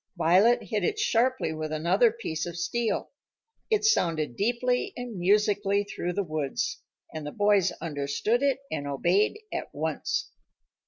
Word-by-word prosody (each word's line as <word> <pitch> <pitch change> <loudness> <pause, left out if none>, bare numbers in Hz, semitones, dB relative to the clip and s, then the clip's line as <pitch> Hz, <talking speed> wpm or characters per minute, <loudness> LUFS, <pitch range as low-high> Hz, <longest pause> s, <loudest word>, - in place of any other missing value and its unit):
Violet 195 +9 +4
hit 215 -4 -2
it - - 0
sharply 255 -4 +1
with 155 0 -4
another 180 +9 +3
piece 170 -8 -4
of 170 0 -6
steel. 225 +6 -1 0.6
It 435 -1 +2
sounded 165 - +2
deeply 245 +4 0
and 245 -6 -6
musically 200 +1 +2
through 180 -3 -4
the 200 - 0
woods, 155 -5 -3 0.3
and 155 -1 -5
the 150 - -5
boys 205 -2 +3
understood 150 - -1
it 275 -1 +1
and 145 -2 -3
obeyed 180 - +1
at - - -3
once. - - -2
200 Hz, 145 wpm, -27 LUFS, 160-235 Hz, 0.6 s, Violet